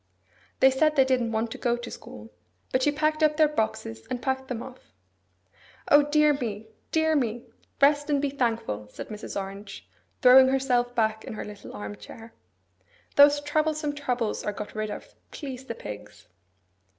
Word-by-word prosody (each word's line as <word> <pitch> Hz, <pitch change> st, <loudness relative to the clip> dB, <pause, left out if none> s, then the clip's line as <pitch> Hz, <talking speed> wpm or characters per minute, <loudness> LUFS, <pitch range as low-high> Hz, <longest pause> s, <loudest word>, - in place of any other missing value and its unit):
They 265 Hz, -, +7 dB
said 305 Hz, +3 st, +2 dB
they 270 Hz, -2 st, +5 dB
didn't 250 Hz, -3 st, +1 dB
want 225 Hz, +1 st, -1 dB
to -, -, -7 dB
go 240 Hz, -1 st, +1 dB
to 240 Hz, 0 st, -8 dB
school; 105 Hz, +1 st, -11 dB, 0.4 s
but 255 Hz, -, +1 dB
she 295 Hz, -, +3 dB
packed 310 Hz, +1 st, 0 dB
up 305 Hz, -1 st, +3 dB
their 310 Hz, -1 st, +6 dB
boxes, 220 Hz, -, -3 dB
and 250 Hz, -, -2 dB
packed 265 Hz, +1 st, -2 dB
them 245 Hz, -2 st, -4 dB
off. 255 Hz, -, -14 dB, 0.9 s
'O 290 Hz, -, +8 dB
dear 300 Hz, +1 st, +3 dB
me, 220 Hz, -5 st, -5 dB, 0.2 s
dear 315 Hz, -1 st, +2 dB
me! 240 Hz, -3 st, -1 dB, 0.3 s
Rest 290 Hz, +1 st, +4 dB
and 290 Hz, -1 st, +2 dB
be 280 Hz, -1 st, -1 dB
thankful!' 225 Hz, -, -2 dB
said 105 Hz, -, -9 dB
Mrs. 210 Hz, -1 st, -5 dB
Orange, 195 Hz, +1 st, -8 dB, 0.4 s
throwing 260 Hz, +1 st, +8 dB
herself 250 Hz, -2 st, +1 dB
back 220 Hz, -1 st, 0 dB
in -, -, -7 dB
her 215 Hz, -, -6 dB
little 210 Hz, -1 st, -10 dB
arm 105 Hz, 0 st, -6 dB
chair. 225 Hz, -, -12 dB, 0.8 s
'Those 290 Hz, 0 st, +7 dB
troublesome 300 Hz, 0 st, 0 dB
troubles 250 Hz, -6 st, -2 dB
are 210 Hz, -, -2 dB
got 210 Hz, +1 st, -7 dB
rid 215 Hz, 0 st, -3 dB
of, -, -, -8 dB, 0.2 s
please 265 Hz, -3 st, -7 dB
the 230 Hz, -, -5 dB
pigs! 105 Hz, -, -10 dB
255 Hz, 175 wpm, -26 LUFS, 220-290 Hz, 0.9 s, O